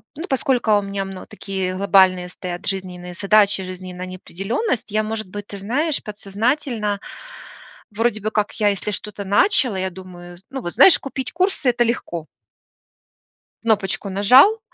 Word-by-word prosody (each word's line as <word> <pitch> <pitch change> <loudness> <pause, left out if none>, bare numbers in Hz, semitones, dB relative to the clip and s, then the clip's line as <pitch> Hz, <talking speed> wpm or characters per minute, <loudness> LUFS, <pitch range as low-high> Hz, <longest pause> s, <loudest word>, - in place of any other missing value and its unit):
ну, 325 +5 -6
поскольку 250 -5 +2
у - - +1
меня 195 0 -4
мно 190 -1 -8
такие 190 -3 -4
глобальные 190 -2 +4
стоят 180 0 -7
жизненные 180 -2 -5
задачи, 200 +1 +3
жизненная 185 0 -7
неопределённость, 195 - -3
я, 215 +1 +1
может 220 -1 -4
быть, 205 +2 -7
ты 200 - -8
знаешь, 270 +10 -1
подсознательно 210 +1 -2 0.9
вроде 225 +1 0
бы 215 - -1
как 210 -1 0
я, 210 - +3
если 200 +1 -2
что-то 205 0 -5
начала, 210 - +3
я 190 0 -1
думаю, 175 -1 -11
зн 190 - -20
ну, 270 -1 -4
вот 175 - -5
знаешь, 280 - +7
купить 265 -2 -5
курсы 365 -6 +1
это 240 0 +2
легко 175 -8 -3 1.4
кнопочку 205 -3 0
нажал. 255 - +6
205 Hz, 150 wpm, -21 LUFS, 190-235 Hz, 1.4 s, знаешь